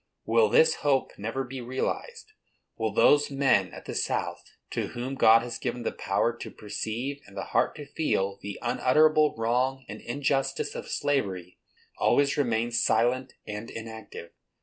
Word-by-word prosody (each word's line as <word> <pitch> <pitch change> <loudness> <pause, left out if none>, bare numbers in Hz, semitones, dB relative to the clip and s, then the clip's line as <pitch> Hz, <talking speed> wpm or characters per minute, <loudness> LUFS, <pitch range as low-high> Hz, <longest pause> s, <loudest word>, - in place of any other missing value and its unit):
Will 460 -1 +4
this 475 0 +5
hope 135 -2 +1
never 115 +6 -2
be 130 0 -7
realized? 430 - -4 0.4
Will 110 -4 -1
those 145 +8 +4
men 140 -1 +2
at - - -11
the - - -5
South, - - -2 0.3
to - - -2
whom 125 +3 -5
God 115 -3 +6
has 120 - -5
given 120 -1 -3
the - - -1
power 105 +4 0
to - - -7
perceive 110 +7 -4
and 100 0 -14
the 95 - -2
heart - - +2
to 145 - -8
feel 100 -10 -1
the 100 0 -6
unutterable 150 +5 +3
wrong 125 +4 0
and 105 - -8
injustice 135 +1 -1
of - - -7
slavery, 95 -11 -2 0.4
always 140 0 +3
remain 120 -4 0
silent 120 +3 +1
and 105 +1 -6
inactive? 110 -6 -8
120 Hz, 155 wpm, -27 LUFS, 110-140 Hz, 0.4 s, God